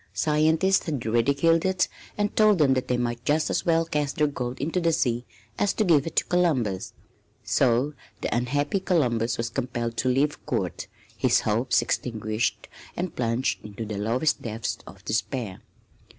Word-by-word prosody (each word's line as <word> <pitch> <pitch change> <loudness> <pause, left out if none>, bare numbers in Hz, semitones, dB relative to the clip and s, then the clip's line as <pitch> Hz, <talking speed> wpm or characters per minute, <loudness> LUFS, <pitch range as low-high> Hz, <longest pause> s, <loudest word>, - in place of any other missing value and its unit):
Scientists 160 +5 +2
had 145 -6 -3
ridiculed 140 +9 +3
it 190 -1 +2 0.3
and 205 0 -1
told 215 -2 +5
them 145 -4 +4
that 130 -1 -1
they 125 - +1
might 120 -1 -2
just 155 +1 +1
as - - -1
well 165 0 +3
cast 150 -3 -1
their 150 - +3
gold 125 -4 -3
into 160 +6 -1
the 165 -1 +2
sea 120 -5 0 0.3
as 205 - +2
to 215 - +1
give 165 -6 +3
it - - -6
to - - +4
Columbus. 130 - 0 0.5
So 130 +3 +2 0.3
the - - -1
unhappy 145 +9 0
Columbus 120 - +1
was 115 0 -2
compelled 120 -2 -3
to 130 - +1
leave 140 +4 +1
Court, - - -2 0.3
his - - +3
hopes 115 +4 +1
extinguished 110 -2 -2 0.3
and 180 -1 -3
plunged 120 +2 -1
into 105 +2 -6
the 105 -2 -4
lowest 120 +9 +1
depths 115 0 -3
of 100 +1 -13
despair. 110 -2 -2
130 Hz, 165 wpm, -26 LUFS, 115-160 Hz, 0.5 s, told